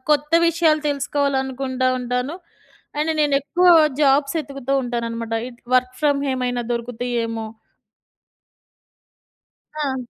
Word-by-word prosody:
కొత్త 300 +1 +1
విషయాలు 325 -2 +3
తెలుసుకోవాలనుకుంటా 270 -2 -1
ఉంటాను. 250 +4 -2 0.6
అండ్ 310 +2 0
నేను 290 -2 +2
ఎక్కువ 350 +6 +1 0.3
జాబ్స్ 280 +1 +3
ఏతుకుతూ 275 -2 -5
ఉంటాననమాట 230 -2 -3
ఇట్ 240 -1 -15
వర్క్ 255 0 +2
ఫ్రమ్ 290 -2 +2
హోమ్ - - -1
ఏమైనా 245 -1 -2
దొరుకుతాయి 245 +1 -4
ఏమో 225 -1 -4 2.4
ఆ! 265 -1 -1
265 Hz, 105 wpm, -21 LUFS, 245-290 Hz, 2.4 s, విషయాలు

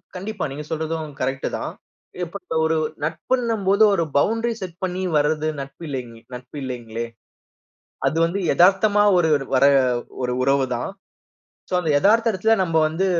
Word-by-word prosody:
கண்டிப்பா. 200 +2 -4
நீங்க 150 +2 -6
சொல்றதும் 160 0 -3
கரெக்ட்டு 135 +1 -1
தான். - - -4 0.5
இப்ப 175 +3 -5
க - - +1
ஒரு 160 0 +1 0.3
நட்புன்னும் 220 +7 -1
போது, 200 +3 +5
ஒரு 170 - +2
பவுண்டரி 225 +8 +1
செட் 180 -3 -6
பண்ணி 185 0 -2 0.2
வர்றது 155 +1 +1
நட்பு 140 +4 -10
இல்லேங் 125 -5 -5 0.2
நட்பு 125 +4 -10
இல்லேங்களே. 120 -3 -5 1.0
அது 160 - 0
வந்து 175 +4 -2
எதார்த்தமா 200 +3 +4
ஒருரு 165 -2 +3 0.3
வர்ற 135 +2 +6 0.6
ஒரு 125 0 -1
உறவு 135 +1 +3
தான். 120 - -4 0.8
சோ - - -6
அந்த 170 -3 -2
எதார்த்த 225 +7 +4
இடத்துல 220 +3 +2
நம்ப 165 -3 +1
வந்து 160 +5 0
165 Hz, 150 wpm, -22 LUFS, 140-195 Hz, 1.0 s, வர்ற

